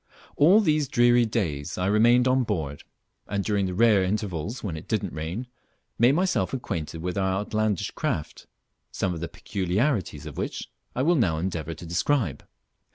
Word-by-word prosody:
All 180 +9 +6
these 155 -6 +2
dreary 120 -2 +4
days 80 - -2
I 90 - -1
remained 120 +5 +4
on 130 +1 +3
board, 80 - -3 0.4
and 100 -1 -1
during 100 -2 0
the 90 - -4
rare 110 -1 +5
intervals 100 - -3
when 95 -7 -3
it 80 - -9
didn't 105 -5 -1
rain, 85 +10 -4 0.5
made 120 +4 +5
myself 180 -3 +1
acquainted 80 - -4
with 90 +2 -2
our 95 -1 +1
outlandish 105 -2 -1
craft, 75 - -4 0.4
some 90 - -1
of 85 - -5
the 85 - -3
peculiarities 100 - -1
of 75 - -8
which - - -4 0.2
I 130 - 0
will 170 +4 +4
now 100 - +2
endeavour 85 -2 -3
to 85 - -10
describe. 85 - 0
100 Hz, 165 wpm, -26 LUFS, 85-120 Hz, 0.5 s, All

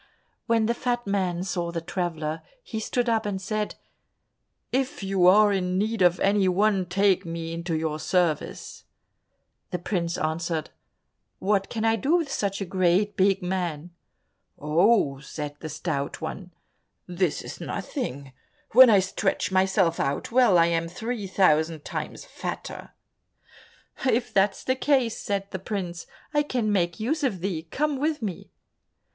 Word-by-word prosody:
When 230 -2 +3
the 235 - +2
fat 240 0 -2
man 185 -3 -1
saw 175 -2 -2
the 170 - -2
traveller, 165 -2 -3 0.2
he 225 - -5
stood 245 +2 -1
up 225 -1 +2
and 205 -3 -2
said, 210 +2 -3 1.0
"If 265 -3 -1
you 190 -2 +3
are 205 +2 +6
in 180 -1 0
need 215 +1 -1
of 175 0 +4
any 195 -1 +3
one, 195 0 +2
take 195 +1 +2
me 165 -1 -5
into 170 -1 -2
your 155 -1 -2
service." 175 -3 -1 0.8
The 180 - -2
prince 175 -1 -2
answered, 160 0 -2 0.7
"What 195 0 0
can 225 -1 -2
I 225 0 +3
do 285 +8 +2
with 325 -5 0
such 200 -5 -1
a - - -1
great 185 +2 +2
big 195 0 +2
man?" 175 -3 -3 0.7
"Oh," 155 -1 +3
said 145 +1 -6
the 155 - -6
Stout 150 -2 -3
One, 180 +3 -6 0.5
"this 180 -2 -1
is - - -8
nothing, 135 +1 -5 0.4
when 255 +2 +9
I 210 - +6
stretch 190 0 0
myself 190 -2 +2
out 140 +9 -1
well, 240 -6 +5
I 165 - +6
am 165 0 0
three 220 +4 -4
thousand 160 -4 +2
times - - -5
fatter." - - -6 1.2
"If 245 -1 +1
that's 195 +1 +2
the 260 - +1
case," 260 -4 +1
said 200 -1 -3
the 190 - -4
prince, 180 -3 -5 0.3
"I 295 - +4
can 245 -7 -1
make 175 -3 0
use 295 +9 -1
of 205 -10 0
thee, 170 -4 -3
come 290 - -1
with 300 -3 -1
me." 195 -5 -5
190 Hz, 150 wpm, -26 LUFS, 170-215 Hz, 1.2 s, when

